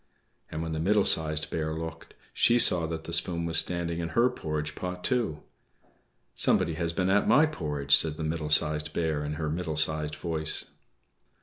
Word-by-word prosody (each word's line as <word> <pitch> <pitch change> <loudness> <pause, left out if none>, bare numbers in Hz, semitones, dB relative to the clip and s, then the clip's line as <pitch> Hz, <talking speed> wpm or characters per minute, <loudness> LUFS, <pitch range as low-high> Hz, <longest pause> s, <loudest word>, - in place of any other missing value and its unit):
And 80 +1 -5
when 80 - -5
the 80 - -3
Middle 100 +4 +2
Sized 75 -1 +2
Bear 80 -1 -3
looked, 80 0 -8 0.2
she 120 - +3
saw 85 -8 +5
that 80 0 -6
the 85 - -6
spoon 85 0 +1
was 80 -2 +1
standing 85 -1 0
in 85 -1 -4
her 125 +2 +4
porridge 75 -8 -4
pot 90 +2 -6
too. 115 - -1 0.9
"=Somebody 80 - +1
has 85 +1 -3
been 90 +2 -1
at 105 +1 +2
my 150 - +5
porridge!=" 75 - 0
said 75 +1 +2
the 80 - -5
Middle 80 -1 -3
Sized 75 +1 +1
Bear 80 -3 -2
in 75 +1 -4
her 80 0 -4
middle 80 0 -4
sized 75 -1 0
voice. 80 -2 0
80 Hz, 185 wpm, -27 LUFS, 75-85 Hz, 0.9 s, saw